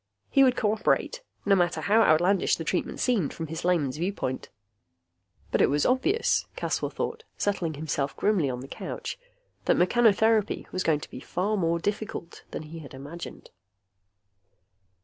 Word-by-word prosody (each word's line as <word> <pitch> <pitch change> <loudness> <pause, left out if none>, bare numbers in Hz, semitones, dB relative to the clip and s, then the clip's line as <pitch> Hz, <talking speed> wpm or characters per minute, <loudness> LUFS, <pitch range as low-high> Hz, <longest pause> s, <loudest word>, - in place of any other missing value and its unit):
He 275 - +6
would 255 -1 +4
cooperate, 220 - +1 0.2
no 200 - +4
matter 175 -2 +1
how 220 +3 +4
outlandish 180 +1 +4
the 165 - -5
treatment 175 +3 -2
seemed 215 - +1
from 165 - -4
his 160 +1 -6
layman's 155 -7 +1
viewpoint. 170 -7 -3 1.0
But - - +2
it - - +5
was 145 +1 +2
obvious, 310 - +2
Caswell - - -1
thought, 460 0 -4
settling 175 -6 -1
himself 145 -2 -2
grimly 195 -9 +2
on 125 -1 -4
the 135 - -8
couch, - - -6 0.5
that - - +3
mechanotherapy 220 +2 +3
was 185 - -2
going 155 -4 +2
to - - -8
be - - -7
far 190 +9 -1
more 170 -4 +1
difficult 205 -2 -4
than - - -5
he 160 +2 -9
had 140 -3 -10
imagined. 145 +6 -9
180 Hz, 155 wpm, -27 LUFS, 155-215 Hz, 1.0 s, He